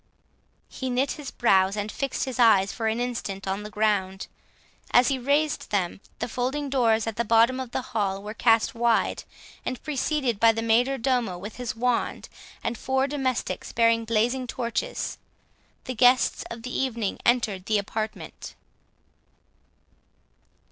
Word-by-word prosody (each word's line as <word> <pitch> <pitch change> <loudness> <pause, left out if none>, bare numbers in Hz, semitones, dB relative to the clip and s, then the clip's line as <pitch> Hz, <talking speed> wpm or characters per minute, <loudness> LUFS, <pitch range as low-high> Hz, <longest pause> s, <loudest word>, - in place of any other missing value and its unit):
He 260 - -5
knit 255 +3 +1
his 290 -3 -6
brows, 195 -3 +3
and 205 +1 -3
fixed 275 -2 -2
his 260 -2 -5
eyes 200 -5 +5
for 225 -2 -2
an 220 +2 0
instant 230 -6 -4
on 195 +2 -1
the 210 - -7
ground; 205 -3 0 0.6
as 245 0 +5
he 270 -2 0
raised 290 +4 0
them, 195 -2 -1 0.2
the - - -3
folding 260 +4 -2
doors 225 -5 +3
at 225 -2 -4
the 235 - +1
bottom 230 +3 +4
of 260 -2 -5
the 250 - -3
hall 200 -3 -1
were 210 +1 -6
cast 225 0 +3
wide, 235 -1 +1 0.4
and, 255 - -3
preceded 275 -5 -1
by 230 0 +6
the 225 0 -3
major 245 +4 +3
domo 245 -7 0
with 205 +4 -8
his 245 -3 -4
wand, 245 +1 -1 0.3
and 230 -1 -2
four 265 0 +1
domestics 265 -3 -2
bearing 230 0 +3
blazing 235 +3 0
torches, 245 - -3 0.6
the 255 - -4
guests 250 +1 +4
of 230 -1 -8
the 250 - -5
evening 235 -6 -1
entered 220 -6 +1
the 215 - +3
apartment. 215 +2 -5
230 Hz, 155 wpm, -26 LUFS, 215-255 Hz, 0.6 s, by